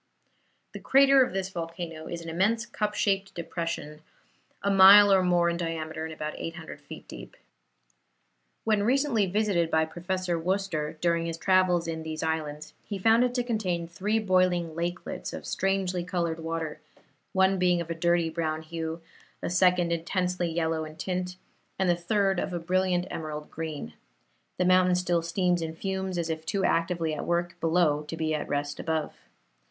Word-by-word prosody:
The -, -, -6 dB
crater 275 Hz, 0 st, +5 dB
of -, -, -3 dB
this 190 Hz, 0 st, -2 dB
volcano 165 Hz, -2 st, -6 dB
is 170 Hz, -1 st, -5 dB
an 165 Hz, -, -7 dB
immense, 210 Hz, +8 st, +1 dB
cup 210 Hz, -2 st, -3 dB
shaped 195 Hz, -1 st, 0 dB
depression, 165 Hz, -3 st, -4 dB, 0.6 s
a 200 Hz, -, +2 dB
mile 195 Hz, +1 st, +9 dB
or 190 Hz, -, +5 dB
more 175 Hz, -1 st, +3 dB
in 170 Hz, 0 st, 0 dB
diameter 160 Hz, -2 st, -4 dB
and 160 Hz, -, -6 dB
about 155 Hz, -1 st, -5 dB
800 165 Hz, -1 st, -7 dB
feet -, -, -11 dB
deep. -, -, -11 dB, 1.3 s
When 215 Hz, -2 st, +2 dB
recently 245 Hz, -2 st, +2 dB
visited 190 Hz, -4 st, +1 dB
by 160 Hz, 0 st, +2 dB
Professor 175 Hz, +1 st, -2 dB
Worcester, 170 Hz, -4 st, -2 dB
during 170 Hz, -1 st, +1 dB
his 165 Hz, -1 st, -4 dB
travels 180 Hz, -1 st, +3 dB
in 160 Hz, -1 st, -3 dB
these 160 Hz, 0 st, -5 dB
islands, 155 Hz, -1 st, -3 dB
he 205 Hz, -, -5 dB
found 225 Hz, +5 st, +4 dB
it 250 Hz, 0 st, 0 dB
to 245 Hz, -, +1 dB
contain 185 Hz, -8 st, -2 dB
three 195 Hz, +6 st, -1 dB
boiling 185 Hz, -5 st, +2 dB
lakelets 175 Hz, +2 st, -4 dB
of -, -, -7 dB
strangely 190 Hz, -2 st, -1 dB
colored 170 Hz, -2 st, -2 dB
water, 165 Hz, -1 st, -4 dB, 0.5 s
one 190 Hz, 0 st, +3 dB
being 180 Hz, -1 st, +3 dB
of 170 Hz, -1 st, -4 dB
a -, -, +1 dB
dirty 170 Hz, 0 st, +1 dB
brown 160 Hz, -1 st, -2 dB
hue, 165 Hz, 0 st, -5 dB, 0.4 s
a -, -, -2 dB
second 180 Hz, -1 st, +3 dB
intensely 180 Hz, +1 st, -1 dB
yellow 160 Hz, -1 st, -1 dB
in 155 Hz, 0 st, -9 dB
tint, 180 Hz, +1 st, -3 dB, 0.4 s
and 190 Hz, -, +1 dB
the 175 Hz, -, +4 dB
third 195 Hz, +2 st, +1 dB
of 180 Hz, -, -3 dB
a -, -, -1 dB
brilliant 180 Hz, +1 st, +1 dB
emerald 150 Hz, -1 st, -6 dB
green. 155 Hz, -, -5 dB, 0.6 s
The 180 Hz, -, +1 dB
mountain 185 Hz, 0 st, +4 dB
still 175 Hz, -1 st, +1 dB
steams 175 Hz, +1 st, 0 dB
and 160 Hz, 0 st, -5 dB
fumes, 190 Hz, -1 st, -3 dB
as 165 Hz, -1 st, -1 dB
if 160 Hz, 0 st, -4 dB
too 190 Hz, +4 st, -1 dB
actively 165 Hz, -1 st, 0 dB
at 150 Hz, -, -4 dB
work 175 Hz, 0 st, 0 dB
below 165 Hz, -3 st, +2 dB
to 165 Hz, -, -5 dB
be 160 Hz, -1 st, -1 dB
at 150 Hz, -1 st, -3 dB
rest 145 Hz, 0 st, -2 dB
above. 160 Hz, -2 st, -2 dB
175 Hz, 170 wpm, -27 LUFS, 160-190 Hz, 1.3 s, mile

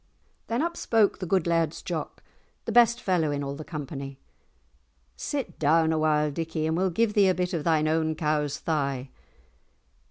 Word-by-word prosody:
Then 235 Hz, +5 st, 0 dB
up 340 Hz, 0 st, -2 dB
spoke 220 Hz, -3 st, +2 dB
the 185 Hz, -, -4 dB
good 185 Hz, -1 st, +2 dB
Laird's 165 Hz, -2 st, 0 dB
Jock, -, -, -5 dB, 0.4 s
the -, -, -2 dB
best 235 Hz, 0 st, +5 dB
fellow 180 Hz, -8 st, +1 dB
in 145 Hz, -1 st, -2 dB
all 140 Hz, 0 st, -3 dB
the 150 Hz, +2 st, -7 dB
company, 140 Hz, -3 st, -6 dB, 1.0 s
"Sit 280 Hz, -3 st, -4 dB
down 160 Hz, +2 st, +3 dB
a 160 Hz, -, 0 dB
while, 150 Hz, -1 st, +2 dB
Dickie, 160 Hz, +1 st, -3 dB
and 160 Hz, 0 st, 0 dB
we'll 185 Hz, +2 st, +1 dB
give 215 Hz, +4 st, +1 dB
thee 205 Hz, -2 st, +5 dB
a 185 Hz, -, +2 dB
bit 180 Hz, +1 st, -2 dB
of 165 Hz, -3 st, -1 dB
thine 155 Hz, -2 st, +2 dB
own 160 Hz, 0 st, +1 dB
cow's 150 Hz, -2 st, 0 dB
thigh." 140 Hz, -4 st, -2 dB
160 Hz, 180 wpm, -26 LUFS, 150-185 Hz, 1.0 s, best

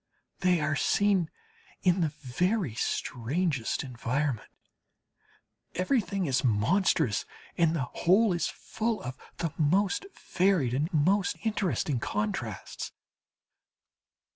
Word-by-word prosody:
They 180 Hz, -2 st, +3 dB
are 150 Hz, -1 st, +1 dB
seen 195 Hz, +1 st, +2 dB, 0.5 s
in 180 Hz, 0 st, +3 dB
the 165 Hz, -, +3 dB, 0.2 s
very 180 Hz, -, 0 dB
strangest 130 Hz, +4 st, -1 dB
environment 125 Hz, 0 st, -2 dB, 1.3 s
everything 195 Hz, -1 st, +1 dB
is 130 Hz, -4 st, +1 dB
monstrous, 125 Hz, -, +2 dB, 0.3 s
and 165 Hz, -1 st, +3 dB
the 145 Hz, -, 0 dB
whole 190 Hz, -, +3 dB
is 175 Hz, -, 0 dB
full 225 Hz, 0 st, -3 dB
of 125 Hz, +1 st, -5 dB, 0.2 s
the 165 Hz, -3 st, -2 dB
most 195 Hz, -, +2 dB
varied 180 Hz, -10 st, +2 dB
and 150 Hz, +7 st, 0 dB
most 185 Hz, +5 st, +2 dB
interesting 175 Hz, -, 0 dB
contrasts. 105 Hz, -2 st, -3 dB
165 Hz, 100 wpm, -29 LUFS, 130-190 Hz, 1.3 s, They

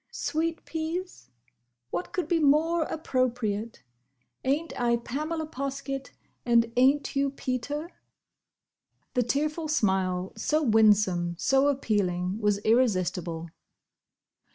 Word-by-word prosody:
"Sweet 330 Hz, +1 st, -2 dB
peas? 325 Hz, -, -5 dB, 0.6 s
What 175 Hz, -, -3 dB
could 365 Hz, -, -2 dB
be 340 Hz, -2 st, +2 dB
more 315 Hz, +3 st, +3 dB
appropriate? 240 Hz, -, -2 dB, 0.6 s
Ain't 295 Hz, +5 st, 0 dB
I 235 Hz, -1 st, +3 dB
Pamela 305 Hz, +7 st, -3 dB
Poskett? 275 Hz, -1 st, -4 dB, 0.3 s
and 235 Hz, -1 st, +3 dB
ain't 270 Hz, +4 st, +3 dB
you 275 Hz, 0 st, +2 dB
Peter?" 280 Hz, +5 st, -4 dB, 1.2 s
The 250 Hz, -, +2 dB
tearful 305 Hz, +6 st, -1 dB
smile, 190 Hz, -9 st, 0 dB
so 305 Hz, +8 st, 0 dB
winsome, 210 Hz, -7 st, +3 dB
so 270 Hz, +8 st, +3 dB
appealing, 200 Hz, -8 st, 0 dB
was 210 Hz, -2 st, +2 dB
irresistible. 185 Hz, -8 st, +1 dB
255 Hz, 100 wpm, -27 LUFS, 210-300 Hz, 1.2 s, more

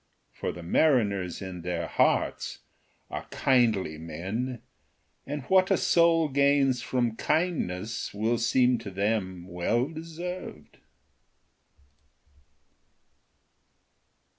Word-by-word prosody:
For -, -, -4 dB
the 85 Hz, -, -9 dB
mariners 100 Hz, -, +1 dB
in 90 Hz, -2 st, -6 dB
their 85 Hz, -1 st, -2 dB
hearts -, -, 0 dB, 0.5 s
are -, -, -5 dB
kindly 110 Hz, -11 st, +1 dB
men, 95 Hz, +10 st, -4 dB, 0.6 s
and 145 Hz, 0 st, -4 dB
what 185 Hz, +6 st, +3 dB
a 195 Hz, -, +4 dB
soul 165 Hz, -1 st, +4 dB
gains 140 Hz, -2 st, +3 dB
from 120 Hz, -3 st, -1 dB
kindness 115 Hz, -, -1 dB
will 110 Hz, +3 st, 0 dB
seem 125 Hz, +1 st, +3 dB
to 110 Hz, -3 st, -7 dB
them 95 Hz, -2 st, -2 dB
well 105 Hz, +9 st, 0 dB
deserved. 165 Hz, -, -7 dB
120 Hz, 90 wpm, -28 LUFS, 95-145 Hz, 0.6 s, a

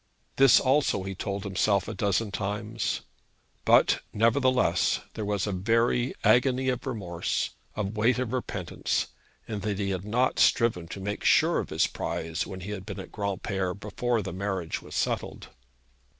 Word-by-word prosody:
This 135 Hz, -2 st, +7 dB
also 135 Hz, -7 st, +2 dB
he 95 Hz, 0 st, -4 dB
told 100 Hz, +1 st, -4 dB
himself 100 Hz, 0 st, +1 dB
a -, -, -4 dB
dozen 100 Hz, 0 st, 0 dB
times. 105 Hz, +3 st, -2 dB, 0.6 s
But, -, -, +5 dB
nevertheless, 120 Hz, -3 st, +2 dB
there 110 Hz, -, -4 dB
was 100 Hz, -2 st, 0 dB
a 105 Hz, -, -2 dB
very 115 Hz, +6 st, +1 dB
agony 130 Hz, +1 st, +4 dB
of 125 Hz, +2 st, -2 dB
remorse, 90 Hz, -9 st, -2 dB, 0.2 s
a 105 Hz, -, -1 dB
weight 110 Hz, +5 st, +1 dB
of 125 Hz, -1 st, -2 dB
repentance, 100 Hz, -8 st, -2 dB, 0.4 s
in 105 Hz, -2 st, -3 dB
that 105 Hz, -1 st, -2 dB
he 100 Hz, -1 st, -1 dB
had 95 Hz, -1 st, -3 dB
not 120 Hz, +5 st, +1 dB
striven 110 Hz, -8 st, +3 dB
to 95 Hz, -, -7 dB
make 105 Hz, +2 st, -4 dB
sure -, -, +4 dB
of -, -, -4 dB
his -, -, +2 dB
prize 80 Hz, +1 st, -3 dB
when 95 Hz, -2 st, -7 dB
he 100 Hz, +3 st, -6 dB
had 100 Hz, -3 st, -5 dB
been 95 Hz, -, -7 dB
at 95 Hz, -, -8 dB
Granpere 95 Hz, -2 st, -2 dB
before 115 Hz, +2 st, -1 dB
the 95 Hz, -2 st, -5 dB
marriage 95 Hz, -3 st, -3 dB
was -, -, -10 dB
settled. -, -, -2 dB
105 Hz, 165 wpm, -27 LUFS, 95-115 Hz, 0.6 s, This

